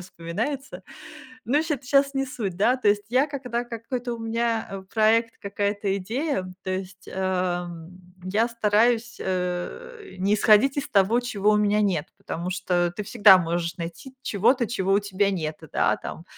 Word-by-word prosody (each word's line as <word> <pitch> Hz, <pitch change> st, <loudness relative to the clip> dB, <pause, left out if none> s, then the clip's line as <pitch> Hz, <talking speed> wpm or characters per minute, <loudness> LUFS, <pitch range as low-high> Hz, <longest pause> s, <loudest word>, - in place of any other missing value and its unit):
вспоминается. 205 Hz, -, -5 dB, 0.6 s
Ну, 285 Hz, +6 st, +2 dB
щит 300 Hz, -4 st, -3 dB
щас 275 Hz, +1 st, +3 dB
не 270 Hz, 0 st, 0 dB
суть, 210 Hz, -9 st, -4 dB
да, 235 Hz, +7 st, +3 dB
то 250 Hz, -5 st, +1 dB
есть 205 Hz, 0 st, +2 dB
я, 255 Hz, +4 st, +3 dB
когда 250 Hz, -5 st, -3 dB
какой-то 240 Hz, +1 st, -4 dB
у -, -, -8 dB
меня, 230 Hz, 0 st, -1 dB
э, 195 Hz, -1 st, -6 dB
проект, 225 Hz, +1 st, +3 dB
какая-то 200 Hz, 0 st, -1 dB
идея, 235 Hz, -, -2 dB, 0.2 s
то 185 Hz, -, -3 dB
есть, 190 Hz, +1 st, -5 dB
эм, 180 Hz, -2 st, -3 dB, 0.2 s
я 210 Hz, +5 st, +1 dB
стараюсь, 230 Hz, +1 st, +1 dB
э, 185 Hz, -, -4 dB
не 195 Hz, +3 st, +2 dB
исходить 215 Hz, +6 st, +4 dB
из 275 Hz, -, -3 dB
того, 205 Hz, +4 st, +3 dB
чего 210 Hz, -4 st, 0 dB
у -, -, +4 dB
меня 210 Hz, 0 st, +2 dB
нет. 180 Hz, -7 st, 0 dB
Потому 175 Hz, +2 st, -5 dB
что 175 Hz, -1 st, 0 dB
ты -, -, -3 dB
всегда 205 Hz, -2 st, +7 dB
можешь 170 Hz, 0 st, -2 dB
найти 170 Hz, +10 st, -7 dB
чего-то, 235 Hz, +4 st, +2 dB
чего 195 Hz, -4 st, -1 dB
у 200 Hz, -, +4 dB
тебя 200 Hz, 0 st, 0 dB
нет, 155 Hz, -5 st, -3 dB
да, -, -, +2 dB
там. 165 Hz, -, -8 dB
210 Hz, 165 wpm, -25 LUFS, 185-240 Hz, 0.6 s, всегда